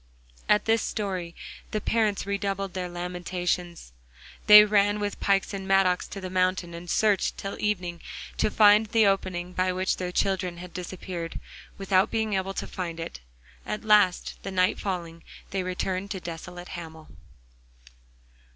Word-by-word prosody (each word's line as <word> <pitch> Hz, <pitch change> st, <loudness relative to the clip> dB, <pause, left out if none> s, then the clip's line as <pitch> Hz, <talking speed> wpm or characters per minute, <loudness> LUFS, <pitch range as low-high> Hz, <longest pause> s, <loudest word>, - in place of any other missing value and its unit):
At 210 Hz, -, +4 dB
this 225 Hz, 0 st, +3 dB
story 185 Hz, -5 st, -3 dB, 0.3 s
the 215 Hz, -, -1 dB
parents 215 Hz, -2 st, 0 dB
redoubled 195 Hz, -1 st, -2 dB
their 180 Hz, -1 st, -3 dB
lamentations. 175 Hz, -, -3 dB, 0.5 s
They 210 Hz, 0 st, +11 dB
ran 205 Hz, 0 st, +3 dB
with 205 Hz, -1 st, -3 dB
pikes 200 Hz, 0 st, +1 dB
and 195 Hz, -1 st, -5 dB
mattocks 195 Hz, -2 st, +3 dB
to 200 Hz, -, -7 dB
the 185 Hz, -, -5 dB
mountain, 185 Hz, -1 st, 0 dB
and 170 Hz, +1 st, -8 dB
searched 210 Hz, -1 st, +2 dB
till 195 Hz, -, -5 dB
evening 180 Hz, -5 st, -2 dB, 0.4 s
to -, -, +3 dB
find 210 Hz, 0 st, +6 dB
the 225 Hz, 0 st, +3 dB
opening 185 Hz, -2 st, 0 dB
by 185 Hz, 0 st, +1 dB
which 185 Hz, +1 st, 0 dB
their 180 Hz, -1 st, -3 dB
children 185 Hz, -2 st, 0 dB
had 180 Hz, 0 st, -10 dB
disappeared, 180 Hz, -1 st, -6 dB, 0.4 s
without 195 Hz, -1 st, +2 dB
being 220 Hz, -2 st, -1 dB
able 195 Hz, 0 st, -1 dB
to -, -, -3 dB
find 170 Hz, -3 st, -5 dB
it. 65 Hz, -, -6 dB, 0.4 s
At 210 Hz, -, -4 dB
last, 205 Hz, -4 st, +3 dB
the -, -, -5 dB
night 185 Hz, -1 st, +1 dB
falling, 170 Hz, -4 st, -4 dB, 0.3 s
they 195 Hz, -, -1 dB
returned 185 Hz, +1 st, -3 dB
desolate 175 Hz, -1 st, -7 dB
to -, -, -12 dB
Hamel. 160 Hz, -3 st, -8 dB
185 Hz, 150 wpm, -26 LUFS, 180-200 Hz, 0.5 s, They